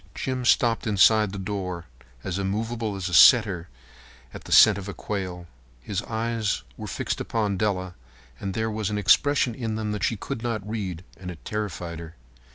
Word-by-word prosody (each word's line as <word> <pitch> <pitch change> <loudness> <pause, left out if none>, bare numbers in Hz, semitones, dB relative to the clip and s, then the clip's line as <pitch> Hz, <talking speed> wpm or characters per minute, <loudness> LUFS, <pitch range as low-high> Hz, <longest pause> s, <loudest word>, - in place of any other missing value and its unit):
Jim 130 -1 -3
stopped 115 +1 +2
inside 105 0 +4
the 100 - -6
door, 95 -3 -4 0.4
as 95 0 -3
immovable 110 +2 -2
as 95 -1 -3
a 90 - -5
setter 100 -5 +6 0.6
at - - -10
the - - -10
scent 105 -3 +7
of 100 0 -7
quail. 90 -4 -4 0.3
His 95 - -3
eyes 115 - -2
were - - -7
fixed - - -3
upon 105 -3 -1
Della, 95 -2 -1 0.5
and 95 -1 -4
there 110 0 -1
was 110 -1 -2
an 105 - -2
expression 125 +6 +3
in 110 -2 -3
them 110 -1 -2
that 105 -1 -3
she 115 - +1
could 130 +4 -5
not 110 -4 -3
read, 95 -6 -4
and 90 0 -8
it 85 -3 -10
terrified 90 -6 -4
her. 85 -1 -10
105 Hz, 175 wpm, -25 LUFS, 95-110 Hz, 0.6 s, scent